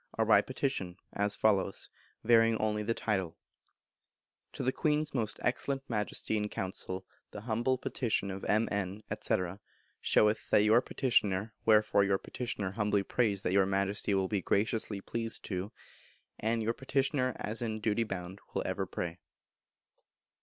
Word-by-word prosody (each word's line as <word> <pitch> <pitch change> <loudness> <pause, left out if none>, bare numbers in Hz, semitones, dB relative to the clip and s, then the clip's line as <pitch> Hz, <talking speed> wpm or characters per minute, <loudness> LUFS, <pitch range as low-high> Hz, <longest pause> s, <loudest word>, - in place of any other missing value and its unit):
are - - +2
by - - +6
Petition, 90 0 -3 0.2
as 100 0 +1
follows, 100 -3 +1 0.3
varying 115 0 +5
only 105 -1 0
the 115 +2 -1
title: 95 -6 -1 1.2
To - - -4
the 130 - +2
Queen's 150 +2 0
most 115 -5 -1
Excellent 135 +2 -1
Majesty 110 -1 -1
in 105 0 -1
Council, 95 -1 -4 0.2
The 105 - -8
humble 120 +3 0
Petition 110 -6 -1
of 95 +1 -6
M.N., 100 -2 0 0.2
&c., - - +2 0.7
showeth 105 +1 +3
That 105 - +5
your 110 +3 +5
Petitioner.... 105 -6 +1
Wherefore 105 -2 +5
Your 100 0 +2
Petitioner 105 -4 -4
humbly 105 -1 +1
prays 100 -2 0
that 90 - 0
Your 95 -1 +4
Majesty 100 +1 0
will 95 -1 +1
be 100 -2 -1
graciously 105 +1 0
pleased 115 +2 -2
to.... 95 +1 -3 0.7
And 115 +1 0
Your 115 +2 +1
Petitioner, 135 -1 0
as 110 +3 -2
in 110 -2 -2
duty 110 +1 +1
bound, 95 -2 -6 0.2
will - - 0
ever - - -2
pray. 85 +1 -4
105 Hz, 145 wpm, -32 LUFS, 100-115 Hz, 1.2 s, by